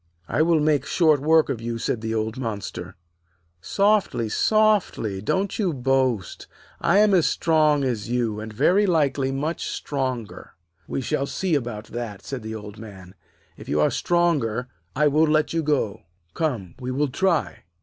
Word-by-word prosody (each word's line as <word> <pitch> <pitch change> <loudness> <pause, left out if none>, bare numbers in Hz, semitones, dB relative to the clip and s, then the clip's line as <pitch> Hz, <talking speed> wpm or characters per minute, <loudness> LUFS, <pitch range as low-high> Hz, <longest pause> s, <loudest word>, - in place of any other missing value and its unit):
'I - - 0
will 165 0 +3
make 150 -3 +2
short 155 -2 +3
work 160 +2 +4
of 115 - -3
you,' 115 0 -3
said 115 0 -2
the 110 0 -2
old 110 +1 -2
monster. 115 -6 -5 0.7
'Softly! 200 - +1
softly! 205 - +1
don't 190 - -1
you 190 -6 +1
boast. 130 -6 0 0.3
I 180 - +3
am 210 -1 +5
as 175 -4 +4
strong 155 -3 +2
as 115 -5 -2
you, 120 -3 -1
and 110 +1 -7
very 180 - +3
likely 145 -5 +1
much 150 +5 -3
stronger.' 130 -6 -4 0.3
'We - - -3
shall 135 +2 -1
see 185 +2 -2
about 120 -7 -2
that,' 115 -4 -6
said 135 -3 -5
the 110 0 -6
Old 105 0 -9
Man. 95 -4 -11 0.4
'If - - -11
you 75 - +1
are 75 - +4
the - - -6
stronger, 145 -9 0 0.3
I 150 +2 +3
will 155 +2 +3
let 155 +1 +1
you 165 - +1
go. 145 -9 -1 0.3
Come; 120 - -2
we 125 -1 -5
will 140 +3 0
try.' 170 +4 0
135 Hz, 170 wpm, -24 LUFS, 115-160 Hz, 0.7 s, am